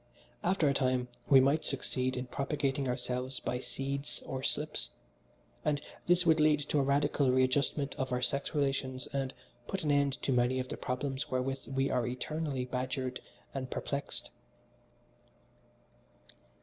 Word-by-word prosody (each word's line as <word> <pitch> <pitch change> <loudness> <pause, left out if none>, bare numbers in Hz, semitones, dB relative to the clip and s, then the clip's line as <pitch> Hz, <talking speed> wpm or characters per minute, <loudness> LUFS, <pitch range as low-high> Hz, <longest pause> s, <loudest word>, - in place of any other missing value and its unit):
After 175 -3 +3
a 140 - +4
time 130 -2 +1 0.2
we 135 - +9
might 140 +4 +4
succeed 130 -1 -1
in 125 - -2
propagating 140 +1 -1
ourselves 125 +1 -2
by 125 - -2
seeds 140 +2 -4
or 130 -1 -3
slips, - - -1 0.7
and 145 -1 +2 0.3
this 175 0 +5
would 160 -1 +5
lead 150 -1 +5
to 150 - +3
a - - +5
radical 140 0 +3
readjustment 135 +2 +2
of 130 -1 -1
our 125 - +1
sex 140 +4 0
relations 135 -2 0
and 135 -1 0 0.4
put 195 -2 -2
an 150 - +2
end 140 -1 +2
to - - +1
many 125 +1 +3
of 130 - -3
the - - -3
problems 130 +1 -2
wherewith 130 +1 -1
we 135 0 +1
are 125 -2 +1
eternally 135 +1 -2
badgered 130 0 -2 0.3
and 130 -2 -3
perplexed. 140 +2 -3
135 Hz, 150 wpm, -32 LUFS, 130-145 Hz, 0.7 s, we